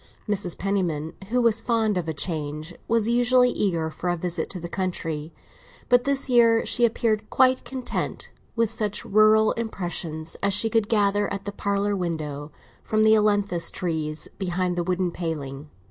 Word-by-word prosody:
Mrs. 195 -4 0
Penniman, 175 -6 -1 0.2
who 250 +2 +1
was 225 -1 +3
fond 225 -3 +1
of 175 -3 -2
a 160 - -1
change, 155 0 -3
was 230 -1 +1
usually 245 +1 +4
eager 165 -5 -1
for 170 +3 -4
a 175 - 0
visit 175 +1 -3
to 185 - -5
the 170 - -6
country; 165 -4 -3 0.6
but 245 -1 +4
this 275 0 +2
year 235 -2 +4
she 240 - +3
appeared 220 -2 0
quite 260 0 +3
content 260 -2 -4 0.2
with 230 -2 +1
such 210 -2 -2
rural 215 +1 +5
impressions 175 -7 -4
as 200 -1 +2
she 225 +1 +1
could 225 -2 +1
gather, 205 -2 +2
at 200 0 -5
the 205 - -3
parlour 200 0 -1
window, 155 -5 -4 0.3
from 215 0 +1
the 220 0 +6
ailantus 205 -5 +2
trees 160 -3 -3
behind 180 -1 -1
the 175 - -1
wooden 180 0 -1
paling. 150 -4 -5
200 Hz, 165 wpm, -24 LUFS, 170-220 Hz, 0.6 s, the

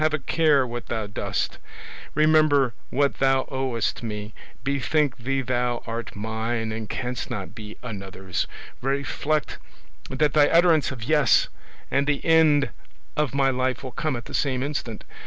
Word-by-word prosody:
have 155 0 +3
a - - -1
care 150 -1 +3
what 120 0 -6
thou 110 -2 -2
dost; 100 - -2 0.6
remember 155 -5 +4 0.2
what 140 +1 +1
thou 135 0 +3
owest 130 -4 -1
me; 105 -2 -5 0.3
bethink 140 +1 +1
thee 135 +3 -1
thou 125 -1 -1
art 115 +1 -5
mine 110 +2 -2
and 110 -1 -5
canst 125 0 -3
not 100 0 -5
be 110 -1 -9
another's; 95 -5 -4 0.3
reflect 140 +3 -1 0.5
that 140 +2 +1
thy 145 -1 +6
utterance 165 -3 +4
of 125 -5 -6
"Yes" 150 -1 +4 0.4
and 140 +1 +2
the 150 -1 0
end 155 -4 +5 0.4
of 150 -4 0
my 135 -1 +3
life 130 0 -1
will 130 - -5
come 155 +1 -1
at 120 -1 -6
the - - -10
same 130 -3 0
instant. 135 -6 -4
130 Hz, 155 wpm, -25 LUFS, 115-145 Hz, 0.6 s, thy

